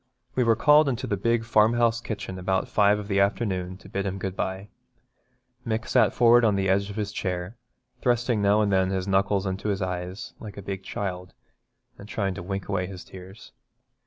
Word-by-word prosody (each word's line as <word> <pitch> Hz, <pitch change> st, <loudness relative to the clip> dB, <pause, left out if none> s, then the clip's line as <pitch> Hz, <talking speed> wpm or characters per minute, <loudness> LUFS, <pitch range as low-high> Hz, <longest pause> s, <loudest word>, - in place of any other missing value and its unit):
We 125 Hz, -, +2 dB
were 115 Hz, -1 st, +4 dB
called 150 Hz, +5 st, +5 dB
into 130 Hz, 0 st, -2 dB
the 105 Hz, -, -1 dB
big 115 Hz, +3 st, +1 dB
farmhouse 115 Hz, +1 st, +3 dB
kitchen 100 Hz, -4 st, -5 dB
about 95 Hz, +1 st, 0 dB
five 105 Hz, 0 st, +3 dB
of 105 Hz, -1 st, -6 dB
the 100 Hz, -1 st, +1 dB
afternoon 95 Hz, -3 st, 0 dB
to -, -, -15 dB
bid 100 Hz, 0 st, -3 dB
him 95 Hz, 0 st, -3 dB
good 95 Hz, -1 st, -4 dB
bye. 95 Hz, +2 st, -4 dB, 0.9 s
Mick 110 Hz, -1 st, -2 dB
sat -, -, +4 dB
forward 120 Hz, 0 st, +5 dB
on 105 Hz, -3 st, +3 dB
the 95 Hz, 0 st, 0 dB
edge 100 Hz, +1 st, +2 dB
of 100 Hz, -, -7 dB
his 105 Hz, -2 st, -3 dB
chair, 90 Hz, +1 st, -3 dB, 0.5 s
thrusting 120 Hz, -2 st, +1 dB
now 100 Hz, +1 st, +4 dB
and 105 Hz, -1 st, +1 dB
then 95 Hz, 0 st, +3 dB
his 95 Hz, 0 st, -2 dB
knuckles 100 Hz, 0 st, +1 dB
into 95 Hz, +2 st, -2 dB
his 100 Hz, -1 st, -1 dB
eyes, 90 Hz, +4 st, -5 dB
like 105 Hz, -3 st, -9 dB
a 100 Hz, -, -7 dB
big 95 Hz, 0 st, -5 dB
child, 90 Hz, -2 st, -5 dB, 0.6 s
and 100 Hz, -, -11 dB
trying 100 Hz, -4 st, -1 dB
to 95 Hz, -, -7 dB
wink 95 Hz, +2 st, -4 dB
away 90 Hz, -2 st, -1 dB
his 95 Hz, -1 st, -9 dB
tears. 95 Hz, +2 st, -12 dB
100 Hz, 200 wpm, -26 LUFS, 95-110 Hz, 0.9 s, called